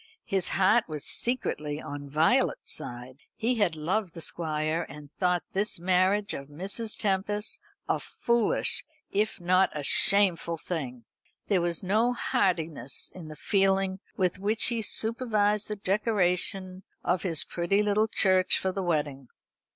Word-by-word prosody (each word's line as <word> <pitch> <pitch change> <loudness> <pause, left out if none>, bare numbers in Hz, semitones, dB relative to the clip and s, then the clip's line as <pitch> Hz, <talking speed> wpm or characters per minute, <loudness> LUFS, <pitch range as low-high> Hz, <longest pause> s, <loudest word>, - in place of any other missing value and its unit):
His 190 -2 0
heart 205 +5 +4
was 150 -2 -5
secretly 150 -12 -1
on 145 -2 -7
Violet's 155 +3 +1
side. 125 +2 -7 0.2
He 235 +1 0
had 185 -6 +2
loved 175 +4 -2
the 165 - -8
Squire, 155 0 -2
and 150 -1 -11
he - - -46
thought 180 -2 +1
this 200 -1 0
marriage 185 +3 +2
of 140 - -6
Mrs. 195 +9 -4
Tempest's 205 +1 -1 0.3
a - - +1
foolish, 235 -2 0 0.3
if 210 +1 0
not 185 +2 +3
a 145 - -4
shameful 180 -1 +4
thing. 130 -9 -5 0.4
There 195 -4 +3
was 170 0 -1
no 220 +6 +2
heartiness 160 - -1
in 175 -4 -10
the 155 - -9
feeling 195 +1 +1 0.2
with 185 -1 0
which 210 +4 +2
he 235 -2 -1
supervised 215 -1 0
the 210 - -3
decoration 190 -2 0 0.2
of 175 0 +1
his 165 -6 +2
pretty 190 +4 0
tittle 210 +1 +2
church 185 -3 +4
for 190 - -1
the 195 - -3
wedding. 145 -6 -2
185 Hz, 145 wpm, -28 LUFS, 160-205 Hz, 0.4 s, heart